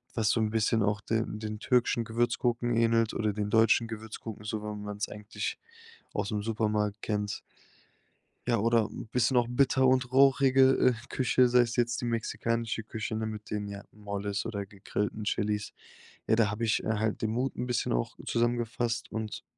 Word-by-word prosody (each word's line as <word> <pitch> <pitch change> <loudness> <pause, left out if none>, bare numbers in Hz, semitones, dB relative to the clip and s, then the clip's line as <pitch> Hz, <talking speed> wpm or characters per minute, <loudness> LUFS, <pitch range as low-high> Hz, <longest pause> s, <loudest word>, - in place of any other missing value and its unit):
was 110 -2 +2
so 115 - +1
'n 110 - +1
bisschen 110 0 +2
auch 105 +1 +1
den 110 -1 -2
den 105 -1 -5
türkischen 120 -1 +2
Gewürzgurken 120 +1 0
ähnelt 115 -1 +3
oder 110 -1 0
den 105 0 -2
deutschen 115 +1 +4
Gewürzgurken, 110 -1 -7
so 105 0 -3
wie 105 0 -4
man's 105 0 -4
eigentlich 105 0 -5 0.6
ausm 105 +1 -1
Supermarkt 105 -2 -1
kennt. 105 -1 -2 1.1
Ja, 120 - +3
oder 115 0 +3
'n - - -7
bisschen 125 +1 +2
auch 120 -1 +4
bitter 130 +1 +3
und 130 -1 +3
rauchige, 135 0 +5
äh, 125 - +4 0.2
Küche, 130 0 +3
sei's 120 -1 +3
jetzt 120 0 +1
die - - -4
mexikanische 115 0 -1
Küche, 110 0 -5
ne, 110 0 -2
mit 110 -1 -6
den, 105 -1 -2
ja, 100 0 -7
Moles 100 -1 -4
oder 100 -3 -4
gegrillten 105 +2 -3
Chilis. 105 0 -1 0.5
Ja, 110 - +4
da 110 -2 +3
habe 110 +3 -2
ich, 110 - +1
äh, - - -5
halt 110 0 -1
den 110 - +1
Mut 125 +4 -1
'n 125 - -2
bisschen 120 -1 0
auch - - -1
zusammengefasst 120 0 -1
und 110 -1 -4
110 Hz, 175 wpm, -29 LUFS, 105-120 Hz, 1.1 s, rauchige